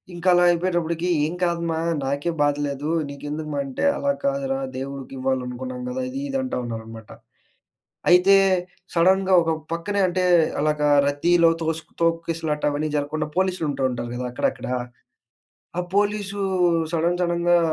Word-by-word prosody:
ఇంక 175 +1 -9
అలా 175 0 +5
అయిపోయేటప్పుడికీ, 175 -1 0 0.2
ఏం 160 - -3
కాదు 170 -1 0
మా, 160 - -1 0.3
నాకే 140 +5 -1
బాధ 145 0 +3
లేదు. 140 +2 -4 0.2
నీకెందుకు 150 +2 -6
మా 140 - -1
అంటే, 135 - -4
"అలా 280 - +1
కాదురా 275 -1 0 0.2
దేవుడికివ్వాలనుకున్నాం 135 - -4
గదా!" 260 +1 -3
ఇది, 270 +2 -5
ఇది 270 - -1
అంటా 260 - -3
ఉన్నారనమాట. 115 -1 -8 1.0
అయితే, 180 +2 +6 0.6
సడన్‌గా 190 +2 +3
ఒక 165 0 0 0.2
పక్కనే 200 +4 -1
అంటే, 185 +1 0 0.4
అలాగా 150 -1 +1 0.2
రద్దీలో 165 +4 +3
తోసుక్ 160 0 -3
తోక్కిసలాట 165 -2 -1
అవన్నీ 155 +2 -1
జరగకుండా 150 +1 -2
పోలీసులు 185 -4 0
ఉంటూ 135 -1 -2
ఉంటారు 120 -1 -4
గదా 125 0 -3
అక్కడక్కడా. 125 +1 -1 1.0
ఆ - - +3 0.2
పోలీసూ 205 -1 0 0.5
సడన్ 170 +2 +1
సడన్‌గా 175 0 +3
165 Hz, 135 wpm, -23 LUFS, 145-185 Hz, 1.0 s, అయితే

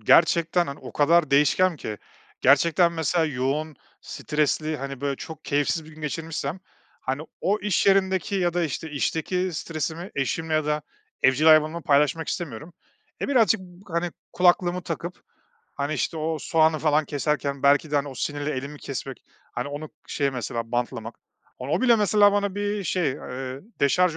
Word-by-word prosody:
Gerçekten, 170 - +4
hani, 140 0 -6
o - - -10
kadar 155 0 +3
değişken 155 +5 +4
ki. 105 -7 -6 0.4
Gerçekten, 170 +6 +4
mesela, 165 +1 +1
yoğun, 145 +2 -2 0.2
stresli, 155 +1 -1
hani, 135 -2 -6
böyle 140 -1 -1
çok 160 -1 -9
keyifsiz 145 +2 0
bir 155 - -13
gün 155 - -14
geçirmişsem, 160 +2 -4 0.4
hani, 135 +3 -3 0.2
o 205 +3 +1
iş 205 -1 +1
yerindeki 190 -2 +2
ya 175 -3 +1
da, 175 - +1
işte, 160 +1 -4
işteki 180 +5 -1
stresimi 160 +3 -4
eşim 160 +4 -2
ya 155 -1 +2
da 150 0 0 0.4
evcil 130 +4 +4
hayvanımla 155 +1 +5
paylaşmak 150 +1 +2
istemiyorum. 155 0 -5 0.5
E, - - -2
birazcık 225 -6 +4
b 180 0 -14
hani, 170 +1 0 0.2
kulaklığımı 180 0 +3
takıp, 175 +1 -5 0.5
hani, 145 +2 -2
işte, 165 - -2
o 160 0 -2
soğanı 160 -1 +2
falan 155 0 +2
keserken 145 -1 -2
belki 145 +2 +4
de, 145 - +1
hani, 145 0 0
o 135 - -8
sinirle 145 +4 -2
elimi 140 +3 -5
kesmek, 135 0 -6 0.3
hani, 125 +3 -3
onu 145 +2 -6 0.2
şeye, 140 -2 0
mesela, 115 -2 -4
bantlamak 120 -1 -2 0.4
Hani, 130 +2 -6
o - - +2
bile, 240 -2 +5
mesela, 205 -1 +4
bana 200 -1 0
bir 205 -1 -2
şey, 180 -6 +1
eee, 130 +1 -6 0.2
deşarj 165 +4 +3
155 Hz, 165 wpm, -25 LUFS, 140-175 Hz, 0.5 s, hayvanımla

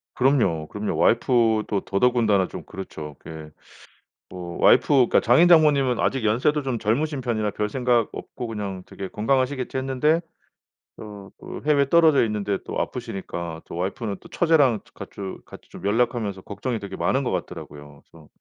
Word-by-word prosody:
그럼요. 110 - +2
그럼요. 105 0 -3
와이프도 110 -4 +2
더더군다나 105 -3 +2
좀 - - -8
그렇죠. 75 -6 -8
그게 80 -1 -10 0.8
뭐 90 -1 -7
와이프 125 - +6
그니까 135 -4 +4
장인 125 +9 +5
장모님은 145 -6 +4
아직 130 -3 0
연세도 130 +7 +1
좀 130 -4 -2
젊으신 140 +7 0
편이라 110 -4 -1
별생각 120 +3 0
없고 120 - -7
그냥 100 -4 -5
되게 95 -1 -7
건강하시겠지 130 +4 -1
했는데 135 +5 +1 0.8
어 105 -2 -10
그 - - -8
해외에 140 -2 +3
떨어져 160 -6 +5
있는데 105 -2 -2
또 - - -4
아프시니까 85 -4 -5
또 - - -9
와이프는 100 +2 -3
또 - - -15
처제랑 145 - +3
같이 95 -1 -8
같이 - - -14
좀 - - -12
연락하면서 105 -3 0
걱정이 110 +4 -4
되게 95 -1 -7
많은 - - +1
것 - - -2
같더라고요. 75 -1 -7
그래서 80 -3 -17
110 Hz, 380 characters per minute, -23 LUFS, 95-130 Hz, 0.8 s, 와이프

